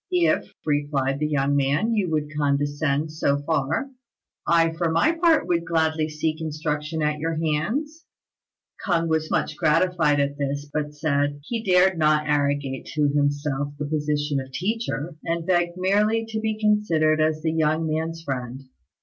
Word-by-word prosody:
"If," 170 -3 +1
replied 145 -2 0
the 150 - 0
young 145 -1 +1
man, 145 +11 +1
"you 205 -5 0
would 150 -1 -2
condescend 145 +1 0
so 145 -2 +1
far, 160 - -1 0.6
I 165 -1 +3
for 165 0 -1
my 165 - +3
part 335 -1 +3
would 170 -1 +1
gladly 160 -1 0
seek 155 +1 -2
instruction 155 0 -3
at 150 0 0
your 165 +1 -2
hands." 220 - -2 0.8
K'ung 170 -4 +1
was 160 0 0
much - - -1
gratified 160 -2 +2
at 140 0 -1
this, 140 +1 -2
but 150 -1 -3
said 145 -1 0
he 225 +7 -4
dared 185 -2 +4
not 150 -1 +3
arrogate 145 -2 0
to 150 -1 +2
himself 145 0 -1
the 150 - -3
position 150 -1 -1
of 130 0 -8
teacher, 175 - -3
and 165 0 -2
begged 175 -1 +1
merely 210 +4 +2
to 220 -1 -2
be 215 0 -2
considered 165 -8 +2
as 155 0 0
the 160 - +1
young 160 0 +1
man's 160 +1 -3
friend. 130 -2 -5
155 Hz, 160 wpm, -24 LUFS, 145-170 Hz, 0.8 s, dared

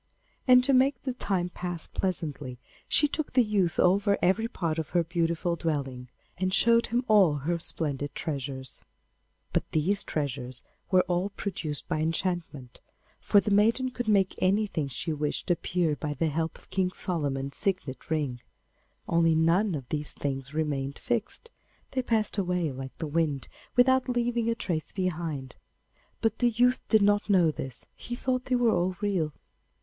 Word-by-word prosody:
And 250 0 +7
to 275 +2 +3
make 260 -1 +3
the 260 - -2
time 190 -7 -1
pass 175 -1 -4
pleasantly, 150 -8 -3 0.3
she 295 - +4
took 300 +1 -3
the 250 -1 +5
youth 200 -6 0
over 200 +3 +4
every 200 +5 +2
part 165 -7 -2
of 155 - -4
her 170 - +4
beautiful 170 0 0
dwelling, 135 -7 -3 0.3
and 185 0 0
showed 230 +4 +4
him 245 +1 0
all 200 -8 +5
her 165 +5 -1
splendid 145 -3 -2
treasures. 135 -3 -3 0.7
But - - 0
these 185 +6 +2
treasures 130 -4 -3 0.3
were 185 -1 +5
all 180 +2 0
produced 180 -7 -4
by - - -1
enchantment, 165 -5 -3 0.4
for 205 - +4
the 205 - -1
maiden 230 +6 +3
could 245 -2 -4
make 195 -3 +3
anything 190 -6 +1
she 135 +5 -3
wished 150 +4 -2
appear 170 -2 +1
by 145 +1 -4
the 160 +4 +1
help 160 +2 -2
of - - -22
King 185 -1 +1
Solomon's 140 -7 -2
signet 185 -9 -2
ring; 145 -6 -1 0.7
only 165 -1 +3
none 170 +4 +3
of 135 -4 -6
these 150 -1 -3
things 135 -1 -3
remained 145 -3 -2
fixed; 245 - -2 0.4
they 260 - 0
passed 220 -4 +1
away 180 -4 0
like 130 0 -8
the 160 - -3
wind 150 -2 -1 0.3
without 260 +1 +4
leaving 240 -1 0
a 230 - +1
trace 170 -8 -3
behind. 165 -8 -3 0.6
But 225 -1 0
the 245 - +4
youth 245 +2 +3
did 220 -2 +5
not 205 +1 +2
know 180 -5 +5
this; 130 -4 -6
he 240 - -6
thought 255 0 -1
they 255 - +1
were 240 -2 +3
all 180 +1 0
real. 185 -8 0
175 Hz, 165 wpm, -28 LUFS, 150-215 Hz, 0.7 s, And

